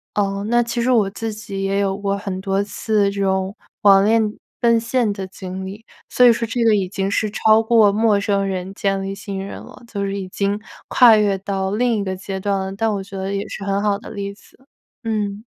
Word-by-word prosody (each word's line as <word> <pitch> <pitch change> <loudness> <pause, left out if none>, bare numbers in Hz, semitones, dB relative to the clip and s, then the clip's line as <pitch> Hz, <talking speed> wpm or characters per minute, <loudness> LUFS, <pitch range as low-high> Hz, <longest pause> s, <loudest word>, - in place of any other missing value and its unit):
呃， 200 -1 0
那 240 0 +3
其 235 0 -2
实 250 - +1
我 215 -5 +4
自 225 +1 -4
己 200 -2 -6
也 195 +1 0
有 195 -1 0
过 200 0 -1
很 195 -2 -5
多 195 +1 0
次， 205 -1 0
这 200 0 -4
种 190 +1 0 0.3
网 195 -1 +7
恋 220 -1 +2 0.3
奔 230 -1 +4
现 230 -2 0
的 190 -2 -6
经 190 0 -7
历， 205 +4 -9 0.2
所 250 - +4
以 235 - +8
说 230 - -3
这 235 +1 -1
个 220 -2 +5
已 190 -3 -1
经 195 -1 -2
是 215 +1 0
超 220 +1 +4
过 220 -3 +5
陌 215 -1 +3
生 200 -1 0
人 190 0 -4
建 195 -1 -1
立 195 0 -4
信 200 -1 -6
任 - - -8
了， - - -14
就 200 -3 -4
是 200 0 -2
已 185 - -5
经 200 +2 -1 0.3
跨 240 -4 +7
越 205 -2 +2
到 190 0 -2
另 240 +3 +1
一 200 - -1
个 190 -1 -3
阶 190 +1 -5
段 200 0 0
了， 190 0 -4
但 225 +1 0
我 195 - -4
觉 195 0 -11
得 190 +1 -3
也 200 - -3
是 200 - -7
很 200 +1 -1
好 205 -1 +1
的 - - -11
例 200 -1 -5
子， 205 - -22 0.5
嗯。 210 -2 -2
200 Hz, 250 characters per minute, -20 LUFS, 195-220 Hz, 0.5 s, 以